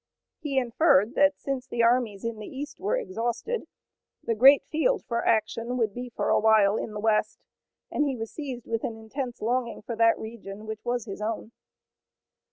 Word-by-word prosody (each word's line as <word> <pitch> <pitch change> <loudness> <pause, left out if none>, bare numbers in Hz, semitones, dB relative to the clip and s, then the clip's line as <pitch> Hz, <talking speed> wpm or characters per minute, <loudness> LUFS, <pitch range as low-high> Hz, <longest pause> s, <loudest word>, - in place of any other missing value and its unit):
He 295 -4 -3
inferred 240 - +3
that 285 0 +4
since 265 -2 -4
the 235 -2 0
armies 230 -4 +2
in 230 -2 -3
the 210 - -7
east 290 +2 -7
were 425 +6 0
exhausted, 375 - -3 0.6
the 230 - 0
great 270 +6 +7
field 425 +9 0
for 235 -1 -1
action 230 +2 0
would 220 -4 0
be 245 +2 -6
for - - -2
a - - +4
while, 215 -2 +5
in - - -3
the 210 - -5
west, 215 0 0 0.5
and 295 - +1
he 270 - -1
was 225 -2 -6
seized 265 -6 -6
with 230 -1 -2
an 225 - -3
intense 240 +2 -6
longing 235 -1 -1
for 230 +1 -4
that 230 0 +4
region 215 -2 -8
which 220 0 -6
was 240 -1 -1
his 200 -1 -7
own. 220 +1 -3
235 Hz, 185 wpm, -27 LUFS, 220-265 Hz, 0.6 s, great